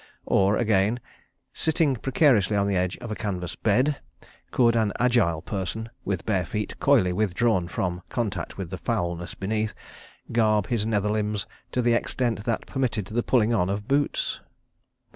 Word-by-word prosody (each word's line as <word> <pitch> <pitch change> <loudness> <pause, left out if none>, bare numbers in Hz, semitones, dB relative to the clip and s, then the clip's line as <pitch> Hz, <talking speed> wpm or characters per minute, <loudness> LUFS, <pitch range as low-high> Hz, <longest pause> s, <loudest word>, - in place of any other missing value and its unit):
Or 100 +1 +3
again: 110 +1 +2 0.5
Sitting 160 -3 +1
precariously 120 - +3
on 100 - +2
the 100 -1 0
edge 90 0 0
of 120 -2 -7
a - - -2
canvas 90 -5 -3
bed, 130 +7 +2 0.5
could 115 -2 +3
an 110 -3 +2
agile 115 -11 +2
person, 110 +3 -4
with 95 -4 -2
bare 95 -4 +1
feet 105 +4 -4
coyly 90 -1 +4
withdrawn 105 -1 +1
from 90 0 -2
contact 115 -5 -3
with - - -5
the - - -5
foulness 85 0 -2
beneath, 110 +2 -2 0.6
garb 110 -3 +3
his 110 -3 -1
nether 105 -2 +1
limbs 105 -2 -1 0.3
to 125 - +1
the 120 0 +3
extent 115 -2 -1
that 115 -2 -1
permitted 120 -7 -1
the 110 +5 -1
pulling 120 -2 +2
on 90 -5 +2
of 100 +2 -3
boots? 140 +1 0
105 Hz, 160 wpm, -25 LUFS, 95-120 Hz, 0.6 s, coyly